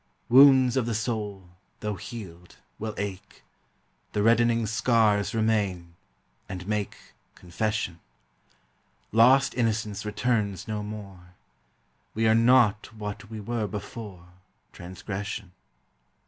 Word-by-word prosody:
Wounds 130 0 +7
of 125 -3 +1
the 115 - -1
soul, 105 -4 -3 0.3
though 105 0 -2
healed, 90 -4 -9 0.2
will 110 0 -4
ache; 100 -2 -6 0.7
The 105 - 0
reddening 115 0 +3
scars 110 -1 +2
remain, 100 -6 0 0.6
and 90 0 -6
make 105 -2 -2 0.4
Confession; 90 -1 -3 1.1
Lost 130 +5 +5
innocence 110 -3 -1
returns 105 -3 -1
no 105 -1 -3
more; 100 -4 -9 0.8
We 110 +1 +2
are 110 - +5
not 115 -2 +4
what 105 -1 -7
we 110 -1 -7
were 110 +1 -2
before 100 -3 -8 0.4
Transgression. 95 +2 -6
105 Hz, 105 wpm, -26 LUFS, 100-115 Hz, 1.1 s, Wounds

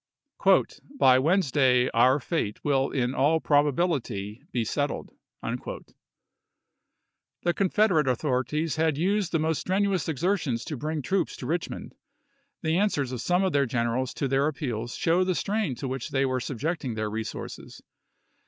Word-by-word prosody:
" 280 - +1
By 130 0 +6
Wednesday 135 -6 +3
our 130 +4 +4
fate 130 - -3
will 135 -2 +2
in 125 -2 -1
all 145 +5 +3
probability 140 - 0
be 120 -2 -1
settled." 145 +5 -2 0.3
The - - -4 1.7
Confederate 190 -5 +2
authorities 135 +4 0
had 160 -2 +1
used 195 +3 +1
the 165 - +2
most 160 0 0
strenuous 190 -2 0
exertions 155 - -1
to 150 - -4
bring 150 +3 -3
troops 190 +2 0
to - - -7
Rich 170 +2 -1
mond. - - -8 0.7
The 160 +1 +1
answers 145 -11 0
of 125 -2 -4
some 180 +5 +2
of 190 -4 0
their 140 -2 +3
generals 120 +2 -1
to 140 - -1
their 135 +2 +2
appeals 120 -7 -3
show 170 +2 +2
the 185 -1 0
strain 200 - -1
to 135 - -5
which 130 -1 -4
they 135 0 +1
were 130 -1 0
subjecting 135 0 -3
their 110 -1 -2
resources. 110 0 -6
145 Hz, 150 wpm, -27 LUFS, 125-170 Hz, 1.7 s, By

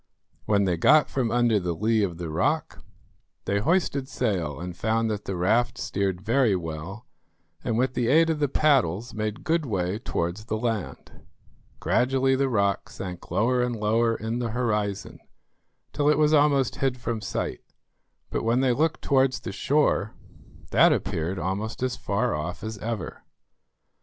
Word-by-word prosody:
When 100 -1 +2
they 90 -3 +1
got 150 - +4
from 125 -4 0
under 120 -2 +2
the 90 -2 -2
lee 110 +4 +1
of 90 -5 -1
the 85 -2 -5
rock, 80 - -1 0.6
they 100 - +1
hoisted 140 - 0
sail 90 - -2
and 90 0 -6
found 110 +3 0
that 105 -1 -4
the 95 - -3
raft 115 +7 +1
steered 95 -2 -2
very 115 0 +2
well, 85 +6 -6 0.6
and 115 -2 -1
with 130 +1 +1
the 120 -2 0
aid 165 +5 +4
of 155 - -2
the 145 - +2
paddles 125 - +1
made 110 0 -4
good 165 -1 +1
way 95 -5 -2
towards 90 -2 -3
the 110 - -2
land. 110 -3 -4 0.6
Gradually 135 +1 +2
the 135 0 +1
rock 100 -2 0
sank 90 -5 -8
lower 120 +8 +2
and 125 -1 -1
lower 115 +2 +1
in 115 +2 -3
the 120 -2 -2
horizon, 105 -4 -2 0.7
till 145 0 +2
it 150 - +4
was 150 0 +3
almost 145 -4 +3
hid 135 -2 0
from 115 -2 -3
sight; - - -3 0.7
but - - -1
when 115 +3 +2
they 130 -2 +3
looked 160 +5 0
towards 130 -2 +2
the - - -5
shore, 140 -7 +1 0.6
that - - +6
appeared 90 0 -1
almost 100 +7 -3
as 130 -1 0
far 110 +5 -1
off 80 +4 -4
as 110 -1 -5
ever. 110 -3 -5
115 Hz, 165 wpm, -25 LUFS, 100-130 Hz, 0.7 s, that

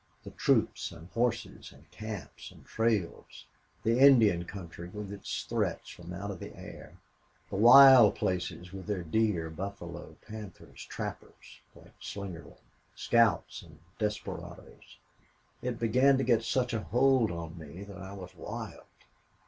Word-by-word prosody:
The - - -9
troops - - +1
and 85 +3 -13
horses 115 0 -2
and - - -19
camps 110 -8 -8
and - - -17
trails 110 - -2 0.4
the 115 +2 +2
Indian 115 -11 +6
country 85 -2 -9
with 105 +1 -7
its 100 - -5
threats - - -2
from 85 0 -11
out 100 +3 -5
of 95 - -8
the - - -9
air - - -11 0.5
the - - -3
wild 120 0 +9
places 90 0 -3
with 95 0 -8
their 100 -4 -2
deer, 85 -2 0
buffalo, 85 0 -7
panthers, 105 -4 -10
trappers - - -8
like - - -17
Slingerland, 90 -6 -8 0.3
scouts, 115 -2 +2
and 80 -3 -16 0.2
desperadoes. 105 -1 -6 0.6
It 125 -2 -3
began 125 +4 +4
to 135 - 0
get 115 -3 +3
such 125 +1 -1
a 110 - -1
hold 125 -1 +3
on 85 -1 -6
me 80 +5 -9
that 100 -3 -10
I 95 +2 -8
was 95 -3 -9
wild. - - -7
100 Hz, 140 wpm, -30 LUFS, 90-115 Hz, 0.6 s, wild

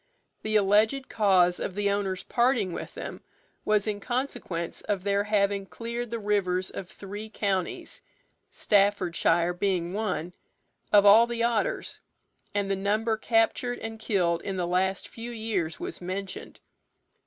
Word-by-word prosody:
The 215 0 -2
alleged 215 +6 +3
cause 185 -5 +3
of 185 - -4
the 205 -1 +1
owner's 195 -2 -1
parting 235 -7 +1
with - - -7
them - - -7 0.4
was 210 -1 +2
in 210 -2 -2
consequence 205 -8 -3
of 200 -3 -2
their 200 0 +1
having 200 -2 +1
cleared 235 +2 -5
the 230 - -3
rivers 195 -4 0
of 180 - -7
three 205 +2 -8
counties 195 -4 -2 0.5
(Staffordshire 185 -4 +2
being 180 -1 -1
one) 180 -5 -2 0.6
of 205 -1 +6
all 220 +4 +8
the 235 -1 -2
otters, 240 - 0 0.6
and 200 -1 +1
the 195 - 0
number 215 +3 0
captured 225 +2 +1
and 225 0 -6
killed 175 -6 +1
in 195 -1 -4
the 180 - 0
last 185 +2 0
few 230 +1 -8
years 215 -9 -2
was - - -5
mentioned. 185 +1 -6
200 Hz, 140 wpm, -27 LUFS, 185-220 Hz, 0.6 s, all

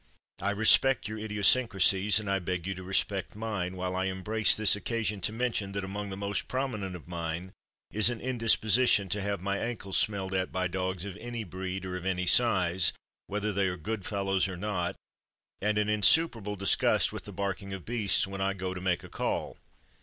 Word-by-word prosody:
I 100 - 0
respect 110 +6 +4
your 110 0 -5
idiosyncrasies, 105 -2 +2
and 105 - -7
I 100 0 +1
beg 90 -1 -3
you 95 - -2
to 95 - -9
respect 95 +1 -1
mine, 105 -5 -3
while 90 0 -3
I 95 +1 0
embrace 95 +3 +2
this 110 -2 +4
occasion 105 -1 -2
to 95 - 0
mention 110 -4 -2
that 100 -1 -3
among 100 +1 -5
the 95 - -6
most 100 -1 -3
prominent 110 -8 -3
of 85 - -11
mine 85 +1 -5 0.4
is 105 +2 +4
an 120 -2 -4
indisposition 115 -3 +3
to 100 +3 -1
have 100 -1 -2
my 100 +1 -1
ankles 110 -5 -2
smelled 95 -3 0
at 95 -1 -1
by 95 +1 0
dogs 95 0 -3
of 100 -2 -6
any 120 0 -5
breed 95 0 -5
or 90 0 -4
of 90 - -8
any 90 -1 0
size, 95 -4 +4 0.3
whether 105 +1 -2
they 95 0 +1
are 90 -1 -3
good 100 +5 -4
fellows 95 -2 0
or 95 -2 -6
not, 90 -3 -2 0.7
and 105 +1 +1
an 105 0 +1
insuperable 105 0 +3
disgust 100 -2 +2
with - - -6
the - - -8
barking 100 0 -4
of 95 -2 -7
beasts 110 -4 +1
when 95 0 -6
I 100 0 +1
go 95 -1 -4
to 90 - -7
make 90 -2 0
a - - -9
call. - - -3
100 Hz, 200 wpm, -29 LUFS, 95-105 Hz, 0.7 s, respect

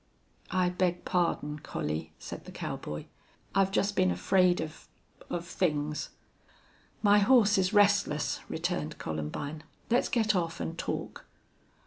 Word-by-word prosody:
"I 185 -1 +2
beg 180 -1 0
pardon, 165 -4 0
Collie," 80 - -4
said - - -8
the - - -9
cowboy. 75 0 -5 0.5
"I've 195 -1 +3
just 200 +1 +1
been 90 - +4
afraid 175 - +3
of 155 -1 -6 0.4
of 175 0 -3
things." 150 -4 -1 0.9
"My 205 0 +6
horse 210 -1 +5
is 185 0 +2
restless," 200 -7 +3
returned - - -2
Columbine. 80 - -4 0.3
"Let's 240 - +3
get 220 -3 +2
off 170 -2 -1
and 165 - -3
talk." - - -4
175 Hz, 125 wpm, -30 LUFS, 150-200 Hz, 0.9 s, My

